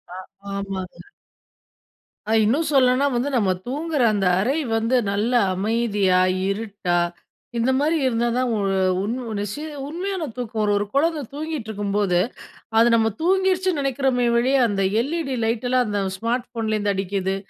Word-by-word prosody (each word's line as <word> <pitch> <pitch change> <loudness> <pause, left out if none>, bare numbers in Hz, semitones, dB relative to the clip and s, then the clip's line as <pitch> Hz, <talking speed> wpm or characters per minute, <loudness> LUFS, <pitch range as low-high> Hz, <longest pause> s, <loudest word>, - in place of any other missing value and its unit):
அ - - -7 0.4
ஆமாங்க. 195 -2 -5 1.3
அ - - +1
இன்னும் 295 +8 +1
சொல்லணுனா, 260 0 +4
வந்து 245 +4 0
நம்ம 200 -6 +2 0.2
தூங்கிற 295 +1 -2
அந்த 200 -2 0
அறை 265 +10 +1 0.2
வந்து 230 +3 +1 0.2
நல்ல 210 +5 0 0.2
அமைதியா, 205 -2 +1 0.3
இருட்டா 200 -4 -2 0.6
இந்த 240 +3 +2
மாரி 305 +4 +2
இருந்தா 240 -1 +1
தான் 250 -1 +1 0.5
உண் 220 +5 -2
உ - - -5
நசி 205 +7 -4 0.3
உண்மையான 355 0 -3
தூக்கம் 230 -3 -3
ஒரு 205 - +2
ஒரு 205 0 0
குழந்த 310 +2 +1
தூங்கிட்டுருக்கும்போது, 210 - -1 0.6
அது 230 +1 +6
நம்ம 225 -1 +3
தூங்கிடுச்சுன்னு 370 -2 +2
நினைக்கிறோமே 265 -2 +1
ஒழிய 260 +3 +2
அந்த 195 -1 -1 0.2
LED 320 -1 -3
லைட்லாம் 245 +2 +1
அந்த 205 -1 -1 0.2
ஸ்மார்ட் 240 +4 -2
ஃபோன்லேருந்து 215 -3 -1
அடிக்கிது, 195 0 -1
235 Hz, 135 wpm, -22 LUFS, 205-275 Hz, 1.3 s, அது